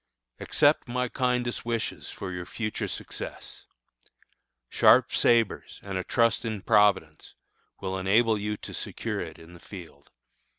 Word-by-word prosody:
Accept - - +3
my 125 0 -1
kindest 125 -2 -1
wishes 115 -1 -3
for 95 - -6
your 90 -1 -6
future 110 +1 -3
success. - - -7 1.0
Sharp - - +5
sabres 115 -3 +2
and 100 -1 -5
a 95 - -1
trust 115 +1 +2
in 110 -4 -4
Providence 100 -8 +2 0.5
will 95 -1 -2
enable 110 +4 +3
you 105 +1 -2
to - - -9
secure - - -4
it - - -7
in 80 +1 -14
the 85 - -13
field. 85 -7 -12
105 Hz, 135 wpm, -27 LUFS, 95-115 Hz, 1.0 s, Sharp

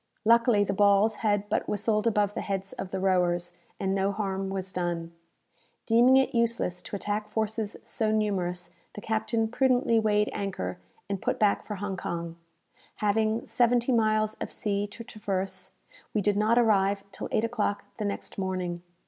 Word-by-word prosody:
Luckily 230 -2 +5
the 195 - -1
balls 205 +2 +4
had 205 -2 0
but 210 - -1
whistled 210 +2 +1
above 205 -2 +2
the - - -3
heads 195 -1 -3
of 190 - -6
the 190 - -3
rowers, 175 -2 +1 0.3
and 190 0 0
no 195 0 +1
harm 195 -2 -2
was 190 -1 -4
done. 170 -2 -2 0.7
Deeming 240 +3 +6
it 265 - +2
useless 230 -6 0
to - - -7
attack 210 +1 -3
forces 220 0 -2
so 220 -2 0
numerous, 180 -5 -1 0.2
the - - -5
captain 225 +1 0
prudently 245 -1 +3
weighed 210 -1 +2
anchor, 90 - -3 0.3
and 195 -2 -3
put - - 0
back 210 -2 +2
for 210 - -3
Hong 195 -1 -4
Kong. 170 -1 -4 0.6
Having 215 +1 +1
seventy 240 +1 +2
miles 215 -2 +2
of - - -4
sea 205 -1 -1
to 220 +3 -10
traverse, 195 -3 -4 0.5
we 210 - +3
did 205 0 +2
not 215 +3 +3
arrive 200 -4 +3
till - - -6
eight 215 - +1
o'clock 220 -3 -1
the 215 - -2
next 200 0 -4
morning. 185 -2 -2
205 Hz, 165 wpm, -28 LUFS, 190-220 Hz, 0.7 s, Deeming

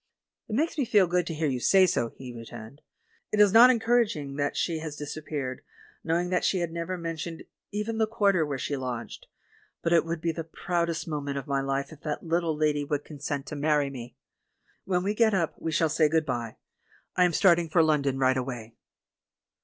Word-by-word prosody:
"It 215 - -3
makes 315 +4 0
me 275 - +2
feel 205 -4 +4
good 180 0 0
to 165 - -3
hear 155 0 0
you 130 -3 -1
say 190 +9 +5
so," 120 -9 0
he 125 -2 -8
returned. 115 +3 -10 0.5
"It 210 - 0
is 205 -2 +6
not 235 +3 +9
encouraging 225 - +1
that 145 0 -1
she 165 -2 0
has 155 -2 -6
disappeared, 145 -3 -5 0.4
knowing 170 +2 0
that 180 - +1
she 190 - +2
had 170 -2 -2
never 170 +2 -3
men 165 -1 -4
tioned 165 +1 -6 0.2
even 210 +2 -3
the 220 - +3
quarter 200 -6 +2
where 145 -3 -3
she 140 +2 -2
lodged; 125 -3 -5 0.6
but 170 - +2
it 170 - +5
would 165 0 -3
be 165 +1 0
the 165 0 -5
proudest 170 0 -2
moment 145 -3 -3
of 135 - -4
my 140 -1 0
life 135 +1 -2
if 150 - -15
that 150 -3 -4
little 165 -1 0
lady 150 -1 +1
would 145 0 -2
consent 145 -1 -5
to - - -6
marry 145 -1 +1
me. 125 -2 -9 0.7
When 180 -1 0
we 200 +2 0
get 220 -1 +3
up 170 -4 0
we 160 - -3
shall 160 +1 +2
say 155 0 +2
'Good 160 0 +2
bye' 120 -4 -3 0.3
— - - -34
I 180 - +4
am 175 -1 +3
starting 170 -2 +4
for 165 +1 +4
London 140 -4 +1
right 130 0 +3
away." 120 -3 -5
160 Hz, 210 wpm, -27 LUFS, 140-180 Hz, 0.7 s, not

